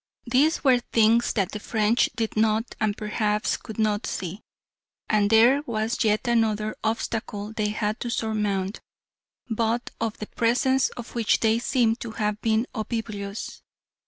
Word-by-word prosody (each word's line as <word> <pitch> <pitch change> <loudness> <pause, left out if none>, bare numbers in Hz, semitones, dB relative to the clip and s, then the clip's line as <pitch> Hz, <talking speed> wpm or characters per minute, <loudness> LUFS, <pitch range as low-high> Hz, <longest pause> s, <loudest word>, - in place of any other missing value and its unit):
These 275 +8 +2
were 260 -3 +5
things 230 0 +3
that 195 -3 0
the 210 - -5
French 220 +2 +2
did 225 -2 -2
not 220 +1 +1
and 210 -2 +1
perhaps 210 0 0
could 220 - -9
not 215 -1 0
see. 185 +3 -4 0.7
And 205 -2 +2
there 235 +6 +6
was 225 +1 -1
yet 215 +3 +1
another 215 -2 +1
obstacle 220 -1 -3
they 215 -2 -1
had 210 +1 -2
to 240 - -4
surmount, 210 -3 -1 0.7
but 230 +1 -1
of 225 -2 -2
the 215 - -5
presence 255 +4 +2
of 240 -1 -8
which 230 -3 +1
they 225 0 +3
seem 235 -2 +2
to 230 -2 -7
have 210 -1 -2
been 225 +1 +2
oblivious. 215 -3 -5
220 Hz, 150 wpm, -25 LUFS, 210-235 Hz, 0.7 s, there